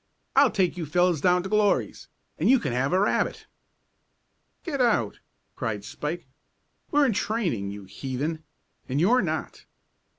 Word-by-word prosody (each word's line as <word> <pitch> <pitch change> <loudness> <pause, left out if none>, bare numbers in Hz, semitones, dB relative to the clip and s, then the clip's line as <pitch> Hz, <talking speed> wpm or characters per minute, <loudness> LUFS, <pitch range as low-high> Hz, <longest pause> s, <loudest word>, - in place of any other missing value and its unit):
I'll 275 -1 +6
take 185 -4 0
you 165 -3 -4
fellows 175 0 +2
down 180 +1 +3
to 190 - -5
Glory's, 210 -1 +1 0.3
and - - +2
you 265 - +7
can 135 - -3
have 135 +4 0
a 185 - +3
rabbit." 205 - 0 1.2
"Get 285 -6 -2
out!" 210 - +1 0.4
cried 110 -3 -3
Spike. 160 +4 -5 0.6
"We're 290 0 +4
in 250 - +2
training, 185 - -1
you 100 0 -7
heathen, 135 - -4 0.5
and 135 +3 0
you're 235 +10 +4
not." - - -4
175 Hz, 145 wpm, -26 LUFS, 135-215 Hz, 1.2 s, you